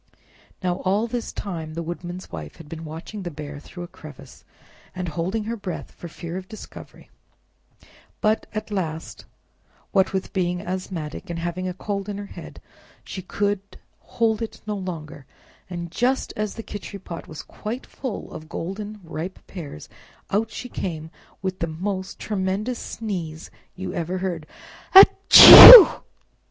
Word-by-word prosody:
Now 180 -1 -1
all 195 +4 -1
this 235 0 -5
time 160 -5 -7
the 170 - -4
Woodman's 175 +2 -8
Wife 75 -3 -8
had 165 - -14
been 160 +1 -9
watching 165 +7 -9
the 180 - -5
Bear 145 -2 -9
through 175 +4 -11
a - - -8
crevice, 155 -3 -14 0.5
and 180 -2 -4
holding 180 +8 -3
her 230 +2 -4
breath 195 -5 -7
for 175 - -11
fear 170 +1 -8
of 190 0 -9
discovery; 215 - -13 1.1
but, 215 +1 0
at 215 0 -6
last, 165 -5 -5 0.7
what 190 -1 +2
with 190 -1 -4
being 180 -2 -1
asthmatic, 180 -5 -6
and 170 - -5
having 175 +2 -4
a 180 - -4
cold 200 +1 -5
in 200 - -5
her 205 - -7
head, - - -12 0.4
she 190 - -8
could 200 +1 -4 0.2
hold 225 -2 -2
it 225 - -6
no 210 -1 -3
longer, 160 -7 -8 0.4
and 170 -2 -7
just 255 +7 -1
as 215 -1 -4
the 225 - -8
Khichri 205 -1 -8
pot 175 -3 -10
was 155 - -9
quite 230 +5 -7
full 260 -6 -7
of 155 0 -10
golden 205 +5 -7
ripe 170 +3 -7
pears, 150 - -10 0.4
out 215 +3 0
she 250 - -8
came 160 -8 -6 0.3
with 190 -1 -4
the 170 - -2
most 190 +4 -5
tremendous 210 +4 -3
sneeze 175 -8 -6 0.2
you 190 - -6
ever 175 +2 -3
heard—"A 180 - +3
h - - +7 0.2
che - - +13
u!" 420 -8 +10
185 Hz, 160 wpm, -22 LUFS, 165-205 Hz, 1.1 s, che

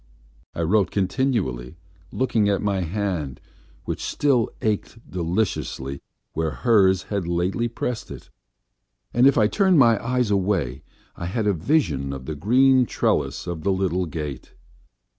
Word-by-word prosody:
I - - -2
wrote 95 +2 +2
continually, 95 - -1 0.3
looking 115 -5 +1
at 100 -1 0
my 100 -2 0
hand, 90 - -3 0.5
which - - -4
still 130 -6 +1
ached 110 +1 -1
deliciously 85 -7 -2 0.3
where 80 0 -1
hers 95 -1 +3
had 100 -4 -1
lately 90 +7 0
pressed 120 0 -4
it, - - -10 0.8
and 125 +3 +5
if 140 - +4
I 110 - +5
turned 190 - +3
my 115 -6 +5
eyes 125 -2 0
away 90 -10 0 0.3
I 85 - -5
had 105 +4 -2
a 105 - +3
vision 80 - 0
of 65 -1 -7
the 80 - -4
green 125 - +4
trellis - - 0
of 85 -3 -4
the 100 - +1
little 95 -1 0
gate. 75 -4 -6
95 Hz, 140 wpm, -23 LUFS, 85-115 Hz, 0.8 s, and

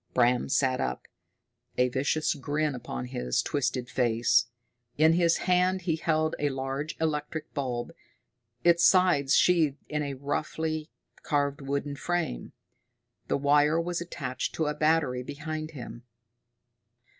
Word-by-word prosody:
Bram 125 0 +3
sat 130 -1 +1
up, 60 -1 -3 0.7
a 125 - +4
vicious 140 +5 0
grin 145 +1 -1
upon 65 - -5
his 60 0 -1
twisted 130 -3 -1
face. 120 -1 +2 0.5
In 160 +2 +5
his 170 -1 +3
hand 185 +1 +2
he 165 -3 +1
held 155 -1 0
a 145 - +1
large 135 +3 -4
electric 155 0 -3
bulb, 125 -4 -3 0.7
its 170 0 +4
sides 170 -8 +4
sheathed 160 -6 +3
in 150 0 -1
a 140 -2 -3
roughly 155 +3 -3 0.3
carved 145 0 0
wooden 140 +1 -3
frame; 175 - -2 0.8
the - - +1
wire 145 +3 +3
was 175 +1 -2
attached 140 -7 -4
to 160 - 0
a 150 - 0
battery 150 -4 +1
behind 155 +3 -5
him. 125 -5 -9
145 Hz, 130 wpm, -28 LUFS, 130-160 Hz, 0.8 s, In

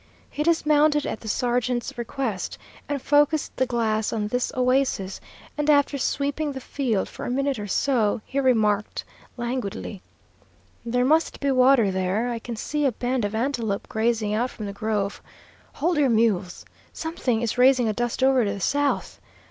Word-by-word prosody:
He - - -4
dismounted 300 -2 +3
at - - -3
the 220 - -10
sergeant's 245 +1 -1
request, 235 -4 -3 0.3
and 285 -1 -1
focused 295 +3 +2
the 260 - +1
glass 220 -3 0
on 210 -2 -2
this 250 +2 -1
oasis, 255 -7 +1 0.4
and 295 0 +1
after 285 -1 +3
sweeping 285 +3 -1
the 265 - -5
field 250 -6 -1
for - - -9
a - - -3
minute 275 0 0
or 205 - -5
so, 225 -1 +1
remarked 220 -6 +1 0.3
languidly, 235 -5 -4 0.8
"There 245 +1 +1
must 315 +4 +2
be 280 -1 +1
water 255 -5 +5
there. 190 +6 0
I 235 - -3
can 235 +1 -6
see 295 +6 -2
a - - +1
band 245 0 -1
of 205 +1 -3
antelope 230 -4 -1
grazing 220 -1 0
out 240 +4 0
from 215 - -7
the 200 - -5
grove. 205 -1 -2 0.5
Hold 330 +2 0
your 280 -3 +4
mules! 215 -6 +1 0.3
Something 260 -8 -2
is 235 +1 -2
raising 255 -2 +5
a 215 - +1
dust 240 +3 -2
over 265 -2 +4
to 200 -2 -1
the 200 - -6
south. 285 +7 0
245 Hz, 165 wpm, -24 LUFS, 220-275 Hz, 0.8 s, water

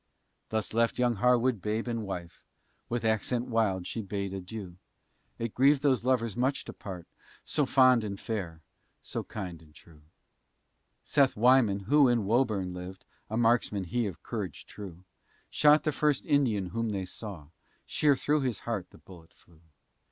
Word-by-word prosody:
Thus 110 -1 -2
left 115 +1 +2
young 120 -3 +1
Harwood 125 -1 +2
babe 110 +4 -2
and 115 -1 -2
wife, 90 -4 -7 0.5
With 120 -1 -2
accent 110 +3 0
wild 105 -6 +1
she 115 - -4
bade 100 -1 -4
adieu; 95 -1 -7 0.6
It 115 -2 -4
grieved 140 +2 +4
those 130 -5 +2
lovers 120 -4 +1
much 130 +3 0
to - - -8
part, 90 -4 -8 0.4
So 145 -3 0
fond 130 -3 +5
and 100 -2 -5
fair, 90 -8 -4 0.4
so - - -4
kind 90 -6 -7
and 75 -2 -20
true. 80 -3 -17 1.0
Seth 140 -3 +3
Wyman, 115 -4 +4
who 140 +7 +4
in 120 -4 +2
Woburn 105 -5 +1
lived 90 +1 -8 0.2
(A 110 - -2
marksman 115 -4 +2
he 115 +5 -1
of 90 -6 -8
courage - - -5
true), 95 -4 -10 0.5
Shot 150 +1 +5
the 155 - +1
first 145 0 0
Indian 115 -10 +1
whom 115 +3 -2
they 95 -3 -2
saw, 90 -6 -8 0.4
Sheer 145 -2 +3
through 150 +3 +1
his 125 -7 -2
heart 100 -6 -4
the - - -17
bullet 85 -4 -16
flew. 85 -2 -24
110 Hz, 160 wpm, -29 LUFS, 95-125 Hz, 1.0 s, fond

